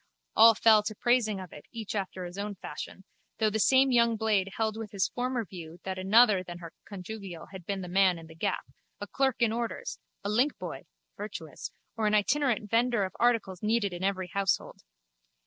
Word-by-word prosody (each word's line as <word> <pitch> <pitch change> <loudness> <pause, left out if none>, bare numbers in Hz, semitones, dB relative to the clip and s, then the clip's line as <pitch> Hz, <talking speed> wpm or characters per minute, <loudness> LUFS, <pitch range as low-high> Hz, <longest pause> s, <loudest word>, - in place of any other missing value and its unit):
All 225 0 +8
fell 220 -1 +6
to 215 +1 -4
praising 235 -3 +2
of 185 -2 -9
it, 150 - -12
each 225 -3 -5
after 190 -3 -3
his 175 +3 -8
own 205 0 -3
fashion, 190 +1 -8 0.3
though 215 -1 +2
the 220 - -1
same 265 +5 +5
young 235 -2 +4
blade 210 -3 +1
held 220 -1 0
with 220 -1 -6
his 195 -2 0
former 245 -2 -2
view 170 -2 -9
that 190 -1 -4
another 205 +1 +5
than 175 -1 -8
her 170 -2 -10
conjugial 195 -3 -8
had 190 -3 -10
been 195 -1 -2
the 180 - -6
man 185 0 +3
in 165 - -10
the 160 - -13
gap, 160 - -2 0.3
a 205 - -4
clerk 265 +3 0
in 225 - +3
orders, 235 - -4 0.2
a - - -2
linkboy 245 +8 -1 0.3
(virtuous) 165 -8 -6 0.3
or 220 -2 0
an 210 - +3
itinerant 240 0 +1
vendor 235 0 +2
of 185 - -8
articles 225 -7 +1
needed 215 -3 +1
in 175 +1 -6
every 190 -2 -1
household. 195 0 -1
210 Hz, 195 wpm, -29 LUFS, 190-230 Hz, 0.3 s, All